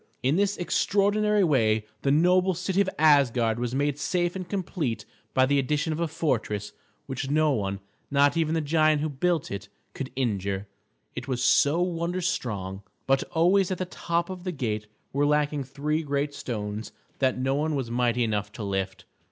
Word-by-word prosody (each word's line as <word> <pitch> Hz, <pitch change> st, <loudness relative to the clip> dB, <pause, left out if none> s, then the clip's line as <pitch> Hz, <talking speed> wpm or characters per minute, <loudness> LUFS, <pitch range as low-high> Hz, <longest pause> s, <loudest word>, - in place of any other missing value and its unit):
In 135 Hz, +4 st, +3 dB
this 200 Hz, +2 st, +1 dB
extraordinary 205 Hz, +4 st, +2 dB
way 110 Hz, -, +2 dB, 0.2 s
the 140 Hz, -, 0 dB
noble 180 Hz, +5 st, +4 dB
city 185 Hz, +3 st, 0 dB
of 195 Hz, -, +1 dB
Asgard 125 Hz, -7 st, +4 dB
was 120 Hz, +1 st, -2 dB
made 145 Hz, +1 st, 0 dB
safe 175 Hz, +1 st, 0 dB
and 185 Hz, -2 st, -5 dB
complete 160 Hz, -, -2 dB, 0.3 s
by 130 Hz, 0 st, +5 dB
the 140 Hz, +1 st, +2 dB
addition 150 Hz, +4 st, 0 dB
of 155 Hz, -, -4 dB
a 170 Hz, -, +1 dB
fortress 115 Hz, -10 st, -2 dB, 0.3 s
which 135 Hz, 0 st, -4 dB
no 155 Hz, +1 st, +3 dB
one, 100 Hz, -6 st, -1 dB, 0.3 s
not 140 Hz, 0 st, +3 dB
even 165 Hz, -1 st, +1 dB
the 160 Hz, -, +1 dB
giant 155 Hz, 0 st, +3 dB
who 155 Hz, -, -1 dB
built 160 Hz, +2 st, 0 dB
it, 100 Hz, 0 st, -6 dB, 0.2 s
could 135 Hz, -2 st, -5 dB
injure, 100 Hz, -5 st, -1 dB, 0.5 s
it 125 Hz, +1 st, -6 dB
was 125 Hz, -2 st, -1 dB
so 160 Hz, +4 st, +4 dB
wonder 175 Hz, 0 st, -2 dB
strong. 100 Hz, -, -3 dB, 0.2 s
But 135 Hz, 0 st, +3 dB
always 180 Hz, +3 st, +3 dB
at 185 Hz, -, -2 dB
the 185 Hz, -, -2 dB
top 170 Hz, 0 st, -2 dB
of 180 Hz, -1 st, -7 dB
the 185 Hz, -, -2 dB
gate 110 Hz, -8 st, -3 dB, 0.3 s
were 145 Hz, +1 st, +2 dB
lacking 150 Hz, -1 st, +1 dB
three 150 Hz, +4 st, -1 dB
great 145 Hz, -1 st, -1 dB
stones 105 Hz, -4 st, -5 dB, 0.3 s
that 130 Hz, -2 st, +2 dB
no 130 Hz, +1 st, 0 dB
one 150 Hz, +2 st, 0 dB
was 130 Hz, -4 st, -3 dB
mighty 120 Hz, 0 st, +1 dB
enough 105 Hz, -2 st, -1 dB
to 110 Hz, -, -6 dB
lift. 95 Hz, -1 st, -3 dB
145 Hz, 180 wpm, -26 LUFS, 120-170 Hz, 0.5 s, by